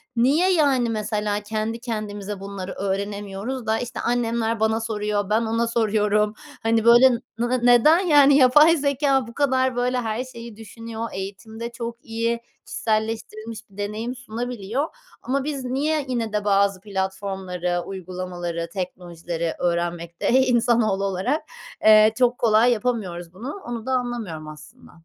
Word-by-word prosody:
Niye, 290 +11 +3
yani, 275 -7 +3
mesela, 210 -1 -1
kendi 215 +2 -3
kendimize 210 -4 -5
bunları 195 -1 -6
öğrenemiyoruz 200 +5 -4
da 220 +1 +1
işte 245 0 -5
annemler 230 -2 0
bana 220 +1 +1
soruyor 210 -2 -2
ben 215 +2 +3
ona 230 +1 0
soruyorum. 210 -2 +1 0.3
Hani 225 0 +2
böyle 240 +3 +8 0.3
nı 240 +1 0
neden 245 +7 +6
yani 290 -6 +6
yapay 295 +5 +6
zekâ 280 -3 +1
bu 235 - -10
kadar 260 -2 +1
böyle 250 +1 0
her 225 +1 -2
şeyi 235 -3 -10
düşünüyor. 225 +1 -7
Eğitimde 220 +4 -6
çok 235 0 -7
iyi, 230 +1 -1 0.3
kişiselleştirilmiş 220 0 -3
bir 195 - -20
deneyim 215 +4 -3
sunabiliyor. 245 +1 -3 0.3
Ama 270 +2 -1
biz 280 -2 -3
niye 285 +4 0
yine 230 -4 -2
de 210 -1 -1
bazı 200 -1 +3
platformları, 190 -3 -3
uygulamaları, 180 -2 -5
teknolojileri 175 -3 -4
öğrenmekte, 170 -1 -1
iii, 260 +1 +5
insanoğlu 235 -5 +2
olarak, 195 +11 -1 0.4
eee, 215 0 +8
çok 245 -1 +3
kolay 225 +1 +4
yapamıyoruz 200 -8 -2
bunu. 265 - -7
Onu 235 -2 -5
da 260 - -2
anlamıyorum 235 -11 -3
aslında. 155 +11 -13
225 Hz, 135 wpm, -23 LUFS, 200-245 Hz, 0.4 s, böyle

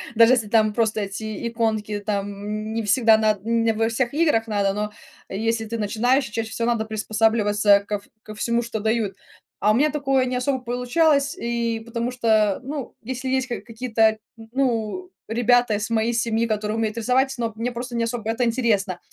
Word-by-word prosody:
Даже 230 +2 +7
если 230 -4 +1
там 215 0 +3
просто 220 -2 +1
эти 215 +2 -4
иконки, 220 -3 -1
там 200 -2 -1 0.2
н 215 +1 -4
не 225 - -1
всегда 220 +1 +4
над 215 -2 +1
не 230 0 +1
во 225 +1 +1
всех 240 +3 -1
играх 295 -8 +2
надо, 200 -2 +1
но 210 0 -3 0.4
если 225 +3 -1
ты 230 +1 -4
начинаешь, 245 +6 +1
чаще 220 +1 -4
всего 230 +1 -2
надо 230 -2 0
приспосабливаться 215 -2 +2
ков 205 -1 -3 0.2
ко 215 -1 -10
всему, 235 +2 0
что 225 -2 -4
дают. 220 -2 0 0.4
А 210 - +3
у - - +3
меня 295 +5 +3
такое 270 -3 +1
не 255 0 -2
особо 260 +1 0
получалось 280 +4 +1
и 235 -1 -1
потому 235 +1 -3
что 220 -5 +2
ну 275 0 -6
если 260 +2 -4
есть 260 0 0
ка 240 - -4
какие-то 225 -2 +1 0.2
н 225 0 -13
ну 255 - -1 0.2
ребята 240 -1 +3
из 210 +2 -3
моей 230 0 +1
семьи, 230 0 0
которые 215 -1 -1
умеют 220 0 -1
рисовать, 255 +4 +2
но 230 -2 -2
мне 235 +3 -2
просто 240 +1 -6
не 235 - +1
особо 230 -1 -3
это 240 +2 0
интересно. 220 -6 +1
225 Hz, 190 wpm, -23 LUFS, 215-245 Hz, 0.4 s, Даже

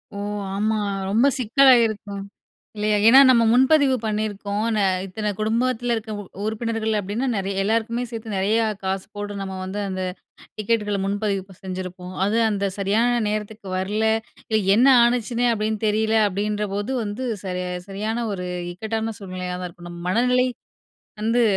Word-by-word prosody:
ஓ! - - -5 0.4
ஆமா, 215 +2 +1 0.3
ரொம்ப 225 +7 +4
சிக்கலாகிருக்கும் 225 -5 +3 0.5
இல்லையா? 210 0 +1
ஏன்னா, 255 +4 +9
நம்ம 235 -2 +5
முன்பதிவு 265 +1 +4
பண்ணியிருக்கோம் 210 -1 -2
நா 210 - +2 0.2
இத்தனை 210 +3 -3
குடும்பத்தில 240 +2 0
இருக்கற 220 -1 -5 0.3
உறுப்பினர்கள் 220 0 -1
அப்டின்னா 205 +7 -2
நெறைய 195 0 -1
எல்லாருக்குமே 230 +3 0
சேர்த்து 225 -3 -5
நெறையா 215 +4 +2 0.2
காசு 190 0 -2
போடு 205 0 -5
நம்ம 190 -1 -5
வந்து 190 +2 -4
அந்த 185 -1 -3 0.5
டிக்கெட்டுகள 210 -1 0
முன்பதிவு 200 -1 -2
செஞ்சிருப்போம். 185 -1 -6
அது 210 +3 +1
அந்த 200 -1 0
சரியான 225 +5 +2
நேரத்துக்கு 210 -1 -4
வரல. 205 +4 -1 0.7
என்ன 245 +4 +5 0.2
ஆனுச்சுன்னே 240 0 +1
அப்டின்னு 215 0 -2
தெரியல 220 +1 +2
அப்டின்றபோது 205 +2 -2
வந்து 210 +5 -4 0.2
சரியா 180 -1 -3 0.2
சரியான 220 +4 -2
ஒரு 180 -2 -4 0.3
இக்கட்டான 220 +3 -3
சூழ்நிலையா 185 -2 -5
தான் 180 0 -5
இருக்கும். 175 0 -12
நம்ம 170 0 -9
மனநிலை 250 +4 +3 0.7
வந்து 230 +2 +2
215 Hz, 135 wpm, -23 LUFS, 195-230 Hz, 0.7 s, ஏன்னா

